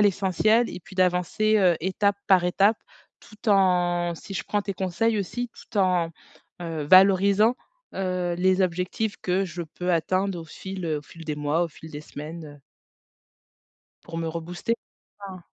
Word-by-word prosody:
l'essentiel 205 +3 +3
et - - -7
puis 190 - -14
d'avancer, 185 +4 +2
heu, 180 -4 +4
étape 195 +3 +1
par 185 -3 +5
étape 200 +5 +3 0.4
tout 215 0 -5
en 175 -3 +2
si 180 - -10
je 195 - -3
prends 205 -1 -1
tes 200 - -3
conseils 195 +4 0
aussi, 240 +5 -3
tout 225 - -12
en, 180 -3 +2 0.5
heu, 160 -3 -4
valorisant, 195 +6 +5 0.4
heu, 180 -2 -1
les 185 +1 +3
objectifs 185 +4 -1
que 185 +2 0
je 175 -1 -6
peux 175 +2 -3
atteindre 185 +3 0
au - - -9
fil, 190 +2 -7
heu, 155 - 0
au - - -18
fil 165 +2 -13
des 150 - -2
mois, 150 +3 0
au - - -4
fil 160 +1 -13
des 145 -1 -7
semaines, 155 +2 -8
heu 145 -1 -13 1.4
pour 165 -1 -6
me 165 -1 -2
rebooster. 170 +7 -3 0.5
Mmh. 185 -1 -9
185 Hz, 165 wpm, -25 LUFS, 170-195 Hz, 1.4 s, par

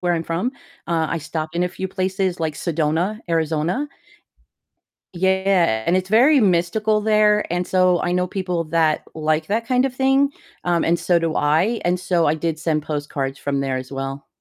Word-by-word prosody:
where 175 -1 +1
I'm 165 - -1
from, 170 +10 -2 0.3
uh, 165 -2 0
I 165 - -1
stopped 160 0 -5
in 175 +1 +1
a 180 - -1
few 190 +1 -5
places 185 -1 -2
like 160 -2 -1
Sedona, 165 +6 -1
Arizona. 165 - 0 1.3
Yeah, 190 -9 +2
and 170 - +2
it's 185 0 0
very 260 +8 +5
mystical 210 +3 +1
there, 210 -1 +3
and 175 0 -1
so 185 -1 +3
I 175 - 0
know 180 0 +1
people 180 -3 -2
that 160 -1 +1
like 155 0 0
that 225 +3 -1
kind 250 +1 +2
of 265 -2 -2
thing, 270 +1 +3 0.3
um, 175 -1 +1
and 170 +1 +2
so 175 0 +2
do 165 -1 -1
I, 165 +11 +1
and 180 0 +1
so 180 -2 +1
I 150 - +3
did 160 0 -2
send 155 -2 -1
postcards 145 -2 -4
from 140 -1 -2
there 135 -1 -1
as 130 +1 -6
well. 135 +1 -5
175 Hz, 185 wpm, -21 LUFS, 155-190 Hz, 1.3 s, very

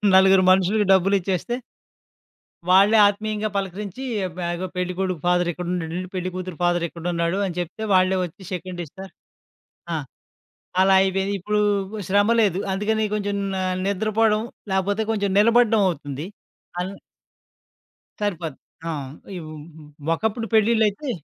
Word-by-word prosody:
నలుగురు 190 0 +6
మనుషులకి 190 +3 +3
డబ్బులిచ్చేస్తే... 190 +3 +1 1.1
వాళ్ళే 200 +4 +6
ఆత్మీయంగా 215 +1 -2
పలకరించి, 200 +4 -4 0.3
మె 180 - -3
ఇగో 185 +2 -4
పెళ్ళికొడుకు 180 -1 -2
ఫాదరిక్కడున్నడండి, 175 -1 -1 0.2
పెళ్ళికూతురు 185 -1 -4
ఫాదరిక్కడున్నాడు 170 0 0
అని 180 -2 -5
చెప్తే 175 +6 -5
వాళ్ళే 185 0 +4
వచ్చి 180 +3 -8
షేకండ్ 180 -1 -5
ఇస్తా. 190 +6 -10 0.9
ఆ! - - 0 0.9
అలా 190 0 +5
అయిపోయింది. 195 +1 0
ఇప్పుడు 210 +3 0 0.5
శ్రమ 205 +2 +3
లేదు, 195 -4 +2
అందుకని 215 +3 0
కొంచెం 205 -1 -2 0.2
న - - -2 0.3
నిద్రపోవడం 215 +2 +2 0.3
లేకపోతే 200 +3 +1
కొంచెం 205 -2 0
నిలబడ్డం 230 0 +4
అవుతుంది. 145 -2 -5 0.5
అన్ 180 +2 -2 1.3
సరిపోద్ది. 170 -8 -3 0.3
ఆ! - - 0 0.5
ఇవ్ 165 -3 -8
హ్మ్, 150 -1 -9
హ్మ్, 150 0 -9
ఒకప్పుడు 220 +5 -2
పెళ్ళిళ్ళైతే 220 +3 +2
190 Hz, 115 wpm, -23 LUFS, 175-210 Hz, 1.3 s, నలుగురు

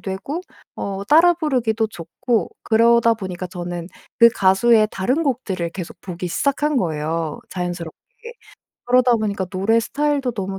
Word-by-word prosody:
되고 195 - -4 0.3
어 195 0 -4
따라 335 +3 +6
부르기도 240 -9 0
좋고 190 +3 -2
그러다 230 +1 +4
보니까 185 -4 -6
저는 175 -1 -6 0.3
그 235 - +9
가수의 215 +1 +3
다른 255 +12 0
곡들을 195 - -2
계속 180 -2 -7
보기 180 -1 -6
시작한 280 - 0
거예요 160 - -2
자연스럽게. 175 -3 -5 0.9
그러다 250 0 +4
보니까 205 -3 -2
노래 195 +5 +1
스타일도 285 0 -1
너무 195 -2 -4
215 Hz, 325 characters per minute, -21 LUFS, 180-245 Hz, 0.9 s, 그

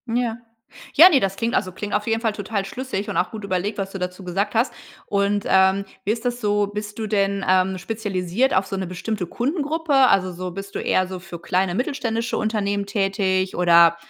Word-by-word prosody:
Ja. 235 -2 0 0.6
Ja, 330 +5 +10
ne, 285 - +4
das 195 0 -1
klingt 230 +1 -1
also, 185 - 0
klingt 205 +3 -6
auf 210 +1 0
jeden 225 0 +1
Fall 220 -3 0
total 205 -1 -3
schlüssig 210 -1 -4
und - - -4
auch - - +1
gut 215 -2 -6
überlegt, 190 +2 -2
was 195 -1 -3
du 195 - -6
dazu 180 +1 -5
gesagt 195 +3 -1
hast. 230 +4 +1 0.3
Und, 200 0 0
ähm, 190 +1 +4 0.2
wie 205 - 0
ist 230 +2 -3
das 245 0 -1
so, 205 -1 +1
bist 210 +1 -6
du 220 - -2
denn, 200 -2 0
ähm, 185 0 +3
spezialisiert 205 +3 -1
auf 190 - +2
so 195 - -4
'ne 190 -1 -2
bestimmte 185 +2 -4
Kundengruppe? 295 - -1
Also, 195 -9 +4
so 180 +1 -5
bist 195 +2 -8
du - - -1
eher 185 0 +1
so 185 0 -6
für 180 -2 -9
kleine 180 +1 0
mittelständische 235 -1 -2
Unternehmen 205 -2 -1
tätig, 195 -2 0
oder 170 -1 +6
200 Hz, 210 wpm, -22 LUFS, 185-225 Hz, 0.6 s, Ja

